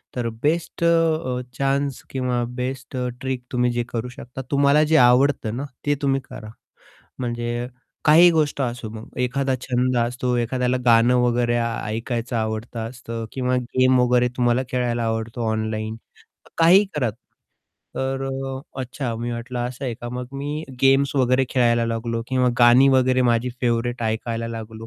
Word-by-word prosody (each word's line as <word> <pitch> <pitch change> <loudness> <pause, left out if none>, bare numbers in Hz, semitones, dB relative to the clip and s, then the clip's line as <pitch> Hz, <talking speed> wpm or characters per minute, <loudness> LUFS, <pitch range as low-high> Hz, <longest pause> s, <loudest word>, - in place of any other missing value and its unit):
तर 120 -2 -1
बेस्ट 165 +2 -1
अ, 160 -6 +2 0.2
चान्स 140 0 0
किंवा 125 -2 -1 0.2
बेस्ट 130 0 -4
अ, 125 0 -1
ट्रिक 130 -2 -3
तुम्ही 125 -1 +1
जे 120 0 -1
करू 120 +1 -3
शकता, 125 +2 -9
तुम्हाला 140 +2 +4
जे 160 - +6
आवडतं 125 -2 +4
ना, 140 - -3 0.2
ते 145 0 +2
तुम्ही 135 -1 +1
करा. 110 - -9 0.7
म्हणजे 120 0 -3 0.4
काही 165 +3 +8
गोष्ट 150 -3 0
असो 120 -3 -3
मग, 110 0 -9
एखादा 130 +1 0
छंद 125 0 0
असतो, 125 +1 0
एखाद्याला 125 +1 0
गाणं 120 +1 +5
वगैरे 120 0 +1 0.3
ऐकायचं 115 +1 -3
आवडत 110 +1 -3
असतं 115 0 -5
किंवा 125 -1 -1
गेम 130 +1 +2
वगैरे 125 0 +3
तुम्हाला 120 +1 +2
खेळायला 120 -2 0
आवडतो 115 +1 -2
ऑनलाईन, 110 0 -2 0.6
काहीही 180 +5 +6
करा. 125 -6 +1 0.9
तर 135 0 -2
अ, 135 0 -4 0.2
अच्छा 130 -1 -4
मी 120 +1 -3
वाटलं 120 +1 -5
असं 130 +2 -8
आहे 120 -3 -2
का. 120 +1 -8
मग 125 0 -5
मी 145 +3 -4 0.2
गेम्स 135 +1 +4
वगैरे 130 0 +3
खेळायला 120 -2 +2
लागलो 115 0 -2
किंवा 130 -1 +2
गाणी 125 +3 +7
वगैरे 130 -1 +3
माझी 120 0 +2
फेव्हरेट 120 0 0
ऐकायला 115 +1 -2
लागलो. 115 0 -7
125 Hz, 150 wpm, -22 LUFS, 120-135 Hz, 0.9 s, काही